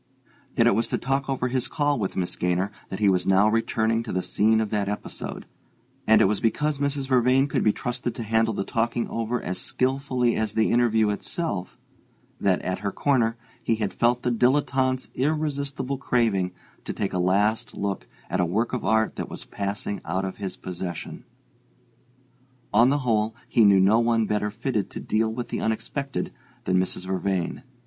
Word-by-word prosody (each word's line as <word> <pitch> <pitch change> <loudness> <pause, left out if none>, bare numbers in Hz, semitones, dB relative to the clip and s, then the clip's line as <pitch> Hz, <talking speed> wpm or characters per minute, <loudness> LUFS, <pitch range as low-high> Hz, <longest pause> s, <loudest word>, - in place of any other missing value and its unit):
Yet - - +5
it - - +5
was 115 - +1
to - - -1
talk 135 +1 -1
over 130 -2 0
his 125 0 -1
call 145 -4 0
with 95 - -2
Miss 90 -2 -2
Gaynor 90 +3 0 0.2
that 95 - -4
he 105 0 +2
was 90 -2 +2
now 95 +2 +5
returning 115 0 +1
to 115 - -6
the 90 0 -1
scene 110 +1 +3
of 110 -2 -1
that 100 -2 0
episode; 105 - -5 0.6
and 110 - +6
it - - +6
was 100 +1 +1
because 150 +5 0
Mrs. 140 -1 -1
Vervain 130 +1 +4
could 135 - 0
be 105 - +5
trusted 120 +1 -3
to 115 - -4
handle 110 0 +1
the - - -1
talking 115 +2 -1
over 115 +2 -1
as 90 +1 -3
skilfully 130 -1 0
as 110 -1 -1
the 110 0 +3
interview 110 -3 +3
itself 100 - -3 0.6
that, 95 -2 +1
at 95 0 -2
her 100 -1 -2
corner, 120 -4 +1 0.2
he 115 - +1
had 105 -3 -2
felt 120 +1 +2
the 125 - +1
dilettante's 130 +1 +1
irresistible 140 -2 -1
craving 110 -9 +1 0.3
to - - -4
take 100 - -2
a 90 - 0
last 105 +5 +1
look 100 -1 -3 0.2
at 95 - -2
a - - +3
work 105 +9 0
of 125 - -2
art 110 0 +1
that - - -4
was - - -7
passing 100 0 -4
out 95 +3 -2
of 95 - -5
his 95 -3 -5
possession. 90 -2 -6 1.5
On 120 +3 +6
the 145 - +2
whole, 110 -1 +1
he 115 - +4
knew 100 -2 +6
no 100 +4 +5
one 115 -1 +2
better 105 0 0
fitted 105 0 -2
to - - -7
deal 110 +1 0
with 120 +1 -5
the - - -3
unexpected 135 +5 -2 0.3
than 95 0 +2
Mrs. 90 0 -2
Vervain. 95 0 -1
110 Hz, 185 wpm, -25 LUFS, 100-125 Hz, 1.5 s, and